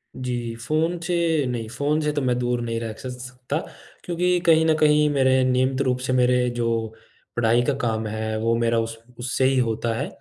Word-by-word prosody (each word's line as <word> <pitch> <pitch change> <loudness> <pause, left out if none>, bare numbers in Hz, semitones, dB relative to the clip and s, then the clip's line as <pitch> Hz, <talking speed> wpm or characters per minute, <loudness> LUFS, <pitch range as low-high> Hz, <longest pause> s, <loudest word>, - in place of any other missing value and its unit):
जी, 120 -2 -4
phone 155 +8 -1
से 165 -4 +1
नहीं, 115 -3 -3
phone 145 +6 0
से 150 0 0
तो 145 - -1
मैं 125 -1 +1
दूर 120 0 -1
नहीं 115 -1 -2
रह 115 -1 -4
स 120 - -13
स - - -4 0.2
सकता 130 +3 -4 0.5
क्योंकि 180 +1 +1
कहीं 160 -1 +5
न 160 - +4
कहीं 150 -1 +4
मेरे 130 -2 +3
नियमित 130 +1 +1
रूप 130 -2 +1
से 130 0 -2
मेरे 125 0 +3
जो 120 -1 0 0.7
पढ़ाई 120 0 +3
का 145 - +1
काम 110 -1 -1
है, 110 0 -3
वो 115 +1 +1
मेरा 115 0 +1
उस 115 0 -3 0.2
उससे 130 +1 0
ही 135 0 +3
होता 115 -1 0
है। 140 - -2
125 Hz, 205 wpm, -23 LUFS, 115-150 Hz, 0.7 s, कहीं